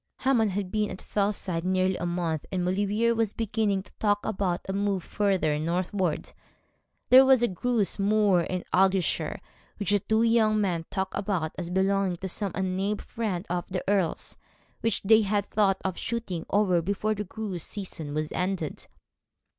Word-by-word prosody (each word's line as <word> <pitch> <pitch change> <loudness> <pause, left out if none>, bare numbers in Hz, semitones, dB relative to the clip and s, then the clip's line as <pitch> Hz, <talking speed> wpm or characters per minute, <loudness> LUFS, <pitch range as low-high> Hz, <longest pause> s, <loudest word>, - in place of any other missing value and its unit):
Hammond 245 -5 +3
had 195 -1 -3
been 210 -1 0
at 185 - -7
Fellside 200 -4 -1
nearly 185 0 +1
a 175 - -3
month, 170 -3 -1
and 180 -2 -1
Maulevrier 205 +5 +1
was 225 -2 0
beginning 215 -3 0
to - - -20
talk 205 -1 +1
about 190 -4 -1
a 190 - -2
move 200 -2 0
further 190 -8 +1
northward. 175 +1 -1 0.8
There 260 +1 +9
was 265 -2 +5
a - - +4
grouse 215 +2 -1
moor 205 -2 +3
in 180 +1 -3
Argyleshire 190 -1 +2 0.4
which 205 -1 -1
the 205 - +4
two 220 +3 +1
young 225 -2 +3
men 175 -5 0
talked 190 -1 -2
about 190 -6 -1
as 175 -2 -5
belonging 190 0 +1
to 190 +2 -5
some 195 +1 -2
unnamed 190 +3 -1
friend 205 -5 -3
of 175 0 -2
the 185 -1 -3
Earl's, 195 -4 0 0.4
which 225 -2 0
they 220 +2 +6
had 205 -1 0
thought 200 -3 +2
of 190 -2 -2
shooting 225 -8 -3
over 190 -4 +3
before 200 +4 -1
the 210 0 -3
grouse 195 -4 -5
season 165 -7 -6
was 155 0 -2
ended. 180 -4 -3
195 Hz, 170 wpm, -27 LUFS, 180-210 Hz, 0.8 s, There